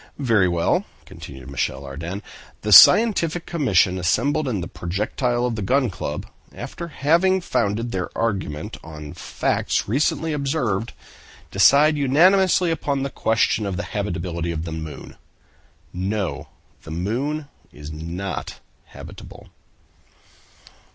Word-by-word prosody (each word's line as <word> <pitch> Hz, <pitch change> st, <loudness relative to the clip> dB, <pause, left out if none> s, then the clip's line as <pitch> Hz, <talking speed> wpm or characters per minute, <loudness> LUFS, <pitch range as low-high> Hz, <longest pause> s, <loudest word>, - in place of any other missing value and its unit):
"Very 115 Hz, -9 st, +3 dB
well," 85 Hz, -1 st, +1 dB, 0.2 s
continued 65 Hz, -2 st, -11 dB
Michel 70 Hz, -, -2 dB
Ardan, 85 Hz, +9 st, -6 dB, 0.4 s
"the 105 Hz, -, -2 dB
Scientific 175 Hz, -, +7 dB
Commission 100 Hz, -, +2 dB
assembled 140 Hz, -, +1 dB
in 110 Hz, -6 st, -1 dB
the 85 Hz, -, -5 dB
projectile 110 Hz, +8 st, -2 dB
of 120 Hz, -2 st, -1 dB
the 110 Hz, -, -4 dB
Gun 125 Hz, +3 st, +1 dB
Club, 85 Hz, -, -5 dB, 0.3 s
after 170 Hz, -, -7 dB
having 170 Hz, +5 st, +2 dB
founded 115 Hz, -, -1 dB
their 90 Hz, -1 st, -3 dB
argument 95 Hz, -9 st, -2 dB
on 75 Hz, -2 st, -9 dB
facts -, -, -1 dB
recently 150 Hz, +7 st, 0 dB
observed, 135 Hz, -7 st, -1 dB, 0.6 s
decide 140 Hz, -, +5 dB
unanimously 180 Hz, +6 st, +4 dB
upon 140 Hz, -4 st, -1 dB
the 140 Hz, -, -3 dB
question 110 Hz, -1 st, +1 dB
of 95 Hz, -2 st, -3 dB
the -, -, -3 dB
habitability 85 Hz, -4 st, -3 dB
of 80 Hz, 0 st, -4 dB
the 80 Hz, -, -5 dB
moon—'No! 90 Hz, +4 st, -7 dB, 0.3 s
the -, -, -12 dB
moon 125 Hz, -, -2 dB, 0.2 s
is 75 Hz, +1 st, -10 dB
not 85 Hz, +5 st, -5 dB, 0.3 s
habitable. -, -, -12 dB
105 Hz, 115 wpm, -22 LUFS, 85-145 Hz, 0.6 s, Scientific